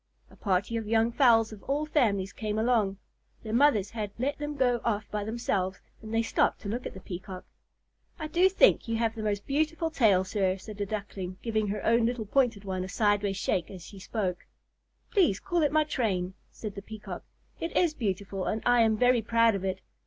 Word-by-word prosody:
A -, -, -16 dB
party 200 Hz, +3 st, 0 dB
of 225 Hz, -2 st, -4 dB
young 225 Hz, +1 st, +2 dB
fowls 230 Hz, -4 st, +4 dB
of 205 Hz, -, -11 dB
all 290 Hz, +2 st, -1 dB
families 210 Hz, -11 st, +1 dB
came 215 Hz, -1 st, -3 dB
along. 220 Hz, -4 st, +2 dB, 0.5 s
Their 220 Hz, -1 st, -5 dB
mothers 235 Hz, -6 st, +3 dB
had 215 Hz, -3 st, -3 dB
let 275 Hz, +5 st, -1 dB
them 295 Hz, 0 st, -4 dB
go 245 Hz, -3 st, +2 dB
off 215 Hz, -2 st, 0 dB
by 210 Hz, -1 st, -2 dB
themselves, 200 Hz, -4 st, -2 dB, 0.2 s
and 220 Hz, 0 st, -9 dB
they 225 Hz, 0 st, +2 dB
stopped -, -, +1 dB
to -, -, -7 dB
look 235 Hz, +5 st, -3 dB
at -, -, -10 dB
the -, -, -8 dB
Peacock. 185 Hz, 0 st, -7 dB, 0.7 s
"I 315 Hz, -, -5 dB
do 350 Hz, +5 st, +3 dB
think 385 Hz, -, +4 dB
you 230 Hz, -, -1 dB
have 225 Hz, -1 st, 0 dB
the 225 Hz, -, -6 dB
most 205 Hz, -2 st, -2 dB
beautiful 315 Hz, +3 st, 0 dB
tail, 205 Hz, -10 st, +4 dB
sir," 190 Hz, -1 st, 0 dB
said 205 Hz, +2 st, -9 dB
a 200 Hz, -, -1 dB
Duckling, 195 Hz, -3 st, -5 dB
giving 220 Hz, -2 st, 0 dB
her 205 Hz, 0 st, -3 dB
own 230 Hz, 0 st, +4 dB
little 240 Hz, -2 st, -2 dB
pointed 230 Hz, -3 st, +1 dB
one 185 Hz, -1 st, -2 dB
a 185 Hz, -, -6 dB
sideways 205 Hz, -2 st, +1 dB
shake 180 Hz, -3 st, -1 dB
as 180 Hz, -4 st, -10 dB
she 200 Hz, -, -11 dB
spoke. 185 Hz, -3 st, -3 dB, 0.6 s
"Please 340 Hz, -, +3 dB
call 350 Hz, -3 st, 0 dB
it 295 Hz, -, +2 dB
my 310 Hz, 0 st, +4 dB
train," 200 Hz, -11 st, -1 dB, 0.2 s
said 215 Hz, -3 st, -7 dB
the 200 Hz, -, -7 dB
Peacock. 215 Hz, +1 st, -8 dB, 0.4 s
"It 330 Hz, -, -3 dB
is 345 Hz, -4 st, +3 dB
beautiful 195 Hz, -5 st, -3 dB
and 220 Hz, -, -2 dB
I 245 Hz, -1 st, +5 dB
am 220 Hz, -1 st, +3 dB
very 245 Hz, 0 st, +4 dB
proud 230 Hz, 0 st, +3 dB
of 195 Hz, -1 st, -3 dB
it. 190 Hz, 0 st, -2 dB
220 Hz, 210 wpm, -28 LUFS, 200-245 Hz, 0.7 s, I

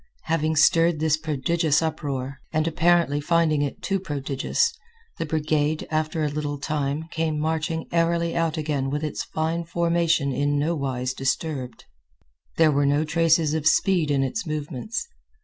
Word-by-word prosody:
Having 160 Hz, -1 st, 0 dB
stirred 165 Hz, +1 st, +4 dB
this 155 Hz, -1 st, +2 dB
prodigious 155 Hz, 0 st, +1 dB
uproar, 140 Hz, -4 st, -3 dB
and, 155 Hz, 0 st, +1 dB
apparently, 165 Hz, -3 st, +2 dB
finding 160 Hz, -1 st, +2 dB
it 145 Hz, -2 st, -3 dB
too 195 Hz, 0 st, 0 dB
prodigious, 145 Hz, -, -1 dB, 0.5 s
the 165 Hz, -, -2 dB
brigade, 155 Hz, 0 st, 0 dB
after 155 Hz, 0 st, 0 dB
a -, -, +2 dB
little 145 Hz, 0 st, -3 dB
time, 145 Hz, +1 st, -2 dB
came 160 Hz, -2 st, -1 dB
marching 160 Hz, +1 st, -1 dB
airily 170 Hz, 0 st, +1 dB
out 165 Hz, -1 st, 0 dB
again 145 Hz, -3 st, -1 dB
with 150 Hz, +2 st, -2 dB
its 155 Hz, -, -3 dB
fine 160 Hz, +2 st, -2 dB
formation 170 Hz, -3 st, +1 dB
in 145 Hz, +2 st, 0 dB
nowise 135 Hz, -5 st, -1 dB
disturbed. 135 Hz, 0 st, -3 dB, 0.7 s
There 160 Hz, -2 st, +5 dB
were 140 Hz, 0 st, +2 dB
no 145 Hz, +2 st, +2 dB
traces 160 Hz, -1 st, +2 dB
of 155 Hz, -1 st, 0 dB
speed 175 Hz, -3 st, +3 dB
in 140 Hz, -2 st, +2 dB
its 200 Hz, +11 st, -2 dB
movements. 155 Hz, -, -4 dB
155 Hz, 150 wpm, -24 LUFS, 145-165 Hz, 0.7 s, There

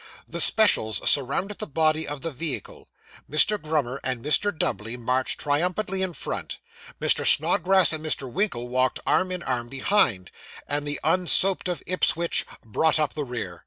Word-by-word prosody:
The -, -, -2 dB
specials 110 Hz, -, +4 dB
surrounded 150 Hz, +9 st, +1 dB
the -, -, -5 dB
body 155 Hz, +1 st, 0 dB
of 145 Hz, -2 st, -6 dB
the 165 Hz, -, -4 dB
vehicle; 145 Hz, +1 st, -6 dB, 0.4 s
Mr. 200 Hz, +9 st, +4 dB
Grummer 145 Hz, -4 st, -2 dB
and 125 Hz, -1 st, -4 dB
Mr. 205 Hz, +7 st, +2 dB
Dubbley 115 Hz, -, -4 dB
marched 125 Hz, +2 st, -2 dB
triumphantly 180 Hz, +6 st, -1 dB
in 185 Hz, -2 st, -2 dB
front; -, -, -5 dB, 0.4 s
Mr. -, -, +3 dB
Snodgrass 190 Hz, -1 st, +4 dB
and 155 Hz, 0 st, -4 dB
Mr. 150 Hz, -3 st, -2 dB
Winkle 125 Hz, -, -3 dB
walked 130 Hz, +1 st, -1 dB
arm 185 Hz, 0 st, +1 dB
in 180 Hz, -2 st, -5 dB
arm 120 Hz, -2 st, -3 dB
behind; 130 Hz, -, 0 dB, 0.4 s
and 145 Hz, 0 st, -3 dB
the 145 Hz, -, -3 dB
unsoaped 185 Hz, +3 st, +3 dB
of 175 Hz, -5 st, -4 dB
Ipswich 170 Hz, -1 st, 0 dB, 0.2 s
brought 155 Hz, +9 st, +1 dB
up 150 Hz, -4 st, -1 dB
the 150 Hz, -, -4 dB
rear. 115 Hz, -9 st, -7 dB
150 Hz, 160 wpm, -24 LUFS, 130-180 Hz, 0.4 s, specials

